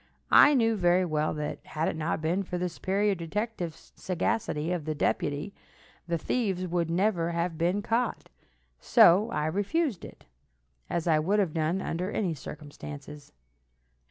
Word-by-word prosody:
I 290 Hz, -, +8 dB
knew 225 Hz, -3 st, +3 dB
very 180 Hz, -1 st, +3 dB
well 155 Hz, -2 st, 0 dB
that, 150 Hz, 0 st, -4 dB
had 155 Hz, +1 st, -2 dB
it -, -, -1 dB
not 160 Hz, 0 st, -2 dB
been 175 Hz, +5 st, +1 dB
for 180 Hz, -2 st, -4 dB
the 180 Hz, 0 st, -1 dB
superior 200 Hz, +4 st, 0 dB
detective 180 Hz, 0 st, -3 dB
sagacity 180 Hz, -4 st, -2 dB
of 175 Hz, -4 st, -2 dB
the 155 Hz, -1 st, -2 dB
deputy, 145 Hz, +5 st, -1 dB, 0.5 s
the 170 Hz, -1 st, 0 dB
thieves 190 Hz, -1 st, -1 dB
would 170 Hz, -1 st, -1 dB
never 170 Hz, -1 st, +1 dB
have 170 Hz, 0 st, -1 dB
been 175 Hz, +5 st, 0 dB
caught, 230 Hz, +2 st, -1 dB, 0.5 s
so 195 Hz, +6 st, +5 dB
I 150 Hz, -, -1 dB
refused 205 Hz, -, -1 dB
it, -, -, -12 dB, 0.6 s
as 170 Hz, -, -1 dB
I 160 Hz, -3 st, +3 dB
would 190 Hz, +7 st, +1 dB
have 190 Hz, -7 st, +1 dB
done 165 Hz, +4 st, 0 dB
under 180 Hz, +3 st, -2 dB
any 190 Hz, -5 st, -1 dB
circumstances. 145 Hz, 0 st, -9 dB
175 Hz, 155 wpm, -28 LUFS, 160-200 Hz, 0.6 s, I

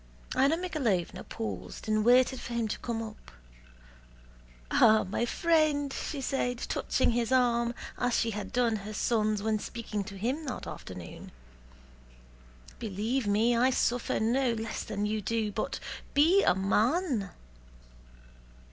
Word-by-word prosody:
Anna 280 Hz, +5 st, +3 dB
Mikháylovna 270 Hz, -, -1 dB
paused 95 Hz, -, -6 dB
and 215 Hz, 0 st, +2 dB
waited 250 Hz, +2 st, +4 dB
for 240 Hz, -, -6 dB
him 230 Hz, -2 st, 0 dB
to -, -, -3 dB
come 230 Hz, -2 st, -3 dB
up. 215 Hz, -1 st, -10 dB, 1.4 s
"Ah, 220 Hz, -1 st, +6 dB
my 220 Hz, +5 st, -2 dB
friend!" 305 Hz, -3 st, +2 dB
she 285 Hz, -, -4 dB
said, 245 Hz, -2 st, -1 dB
touching 245 Hz, -, 0 dB
his 235 Hz, 0 st, 0 dB
arm 240 Hz, -2 st, +2 dB, 0.2 s
as 245 Hz, -1 st, +1 dB
she 230 Hz, -, +1 dB
had 205 Hz, -2 st, -5 dB
done 235 Hz, -3 st, +2 dB
her 210 Hz, +1 st, -7 dB
son's 215 Hz, -3 st, +1 dB
when 220 Hz, -1 st, +1 dB
speaking 215 Hz, -2 st, -4 dB
to 195 Hz, +1 st, -8 dB
him 255 Hz, +10 st, -2 dB
that 255 Hz, -, -5 dB
afternoon, 90 Hz, -3 st, -9 dB, 1.5 s
"believe 225 Hz, +3 st, -2 dB
me 220 Hz, +4 st, +3 dB
I 250 Hz, +3 st, +4 dB
suffer 245 Hz, -1 st, 0 dB
no 240 Hz, +2 st, +2 dB
less 225 Hz, -1 st, -4 dB
than 205 Hz, 0 st, -3 dB
you 215 Hz, +1 st, -1 dB
do, 220 Hz, 0 st, -1 dB
but -, -, -3 dB, 0.4 s
be 335 Hz, +8 st, +6 dB
a -, -, +3 dB
man!" 220 Hz, -, +1 dB
230 Hz, 140 wpm, -29 LUFS, 210-255 Hz, 1.5 s, Ah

